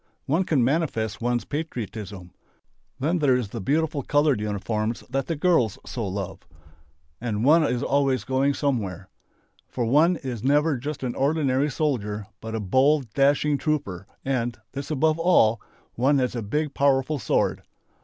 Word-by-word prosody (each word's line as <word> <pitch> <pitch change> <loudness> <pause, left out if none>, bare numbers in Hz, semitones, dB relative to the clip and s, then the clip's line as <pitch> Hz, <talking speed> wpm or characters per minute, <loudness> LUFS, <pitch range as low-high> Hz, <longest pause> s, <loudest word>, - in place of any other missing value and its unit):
One 165 +7 +1
can 140 -8 +2
manifest 125 - -1
one's 120 0 0
patriotism. 110 - -5 0.7
Then 160 +6 +1
there 140 -4 +4
is 125 -5 -2
the 115 +1 -6
beautiful 150 +5 0
coloured 145 -4 +2
uniform 105 +2 -2 0.2
that 135 0 -1
the 165 - -1
girls 145 - +2
so 115 -5 -4
love 95 0 -4 0.8
and 115 -1 -1
one 160 +3 +6
is 125 -5 0
always 135 -2 +1
going 135 +2 +1
somewhere. 100 -10 -2 0.6
For 120 - -2
one 155 +9 +4
is 125 -8 -6
never 145 +3 +3
just 145 +3 -5
an 125 -2 -2
ordinary 140 -1 +1
soldier 110 -8 -2 0.2
but 110 0 -5
a - - -1
bold, 130 +4 +2
dashing 140 +1 +2
trooper, 100 - -2 0.2
and 120 -3 -1
this 140 +1 -6
above 155 +2 +1
all! 115 -11 +4 0.3
one 135 +4 +2
has 125 -2 0
a 120 - -2
big 145 +8 -2
powerful 140 +1 +2
sword. - - 0
135 Hz, 155 wpm, -25 LUFS, 115-150 Hz, 0.8 s, one